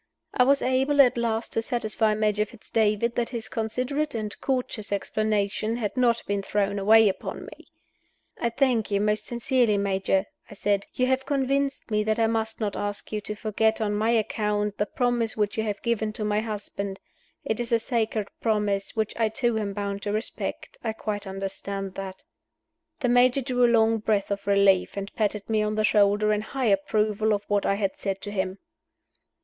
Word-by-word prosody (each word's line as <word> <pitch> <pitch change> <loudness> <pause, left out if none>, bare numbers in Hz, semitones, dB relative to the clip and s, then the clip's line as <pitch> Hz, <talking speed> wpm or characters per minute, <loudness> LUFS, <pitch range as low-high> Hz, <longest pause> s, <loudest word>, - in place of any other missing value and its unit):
I 250 - +4
was 280 +1 +3
able 265 +3 +1
at 260 -3 +7
last 230 -1 -1
to 225 - +1
satisfy 220 -2 0
Major 210 -1 +1
Fitz 225 0 -16
David 220 +1 +2
that 235 -1 -1
his 235 -3 -5
considerate 255 +6 -2
and 215 -2 -3
courteous 250 -6 -2
explanation 215 +1 0
had 220 -4 -3
not 240 -2 +2
been 200 0 -1
thrown 200 0 -1
away 220 +2 +6
upon 195 - -3
me. - - -13 0.7
"I 235 - +1
thank 245 -3 +1
you, 200 -1 +1
most 210 +1 0
sincerely, 240 -2 +1
Major," 195 -1 +1 0.2
I 205 - -10
said 200 0 0
"You 255 - +2
have 260 +1 0
convinced 275 -2 0
me 210 0 +2
that 215 0 0
I 225 - +3
must 225 0 -1
not 210 -3 -2
ask 205 0 -4
you 210 -1 -2
to 210 +1 -5
forget, 220 +1 +1
on 210 -2 0
my 215 +2 +1
account, 210 -2 0
the 210 - +1
promise 240 -2 0
which 210 -1 0
you 220 - 0
have 205 -2 -3
given 225 -2 0
to 215 - -3
my 210 0 +1
husband. 200 -2 -5 0.5
It 220 - -1
is 240 -1 -3
a 230 - +5
sacred 225 -3 -1
promise, 210 -3 0
which 220 -1 -1
I 225 -1 +2
too 235 0 0
am 205 -2 -2
bound 200 0 -3
to 205 - -2
respect 215 +3 -4
I 220 -2 -1
quite 210 -2 -4
understand 195 0 -5
that." 190 -1 -7 0.8
The 250 - +1
Major 245 +2 +4
drew 250 -1 +1
a - - +7
long 225 -1 +4
breath 210 -2 0
of 200 0 -3
relief, 200 -1 +3
and 200 0 -5
patted 210 -1 -1
me 220 -1 +1
on 210 0 -1
the 215 - +1
shoulder 210 0 +3
in 210 - 0
high 260 +4 -3
approval 215 +2 +1
of 205 - -5
what 205 -1 +1
I 195 - +2
had 200 -1 -2
said 195 -1 -2
to 205 - -6
him. 190 -1 -2
215 Hz, 195 wpm, -26 LUFS, 205-235 Hz, 0.8 s, at